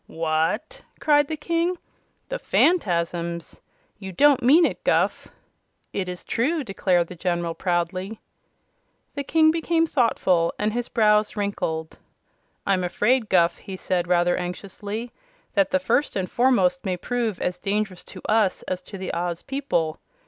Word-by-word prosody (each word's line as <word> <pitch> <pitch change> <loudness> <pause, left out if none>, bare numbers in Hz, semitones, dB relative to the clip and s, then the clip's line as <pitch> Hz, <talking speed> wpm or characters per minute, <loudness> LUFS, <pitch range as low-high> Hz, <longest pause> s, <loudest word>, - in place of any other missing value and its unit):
"What!" 165 - -1 0.2
cried 290 -1 +3
the 315 - -4
King. 335 +3 0 0.5
"The - - -3
Phanfasms! 170 - 0 0.4
You 190 -2 -7
don't 285 +8 +4
mean 300 +8 +6
it, - - -3
Guph!" - - +1 0.7
"It 185 -2 -2
is 180 0 -7
true," 290 +7 0
declared 185 -5 +1
the 180 - -10
General, 175 -1 -1
proudly. 185 +4 -2 0.9
The 285 - -3
King 315 +2 +4
became 330 0 +1
thoughtful, 190 - +1
and 210 +1 0
his 240 0 -2
brows 210 -2 +3
wrinkled. 160 -6 -3 0.7
"I'm 190 -2 +1
afraid, 215 +6 +1
Guph," 170 -2 +3
he 190 -2 -8
said 180 -1 -1
rather 175 0 +3
anxiously, 200 +5 -5 0.4
"that 195 -2 +3
the - - +3
First 230 +10 0
and 185 -2 -1
Foremost 265 +3 +2
may 185 -3 -2
prove 230 -1 -2
as 180 - -2
dangerous 200 -2 -2
to - - -11
us 215 -3 +2
as 185 -1 -4
to 195 - -10
the 185 -1 -5
Oz 170 0 -3
people. 265 - -1
200 Hz, 145 wpm, -24 LUFS, 175-255 Hz, 0.9 s, mean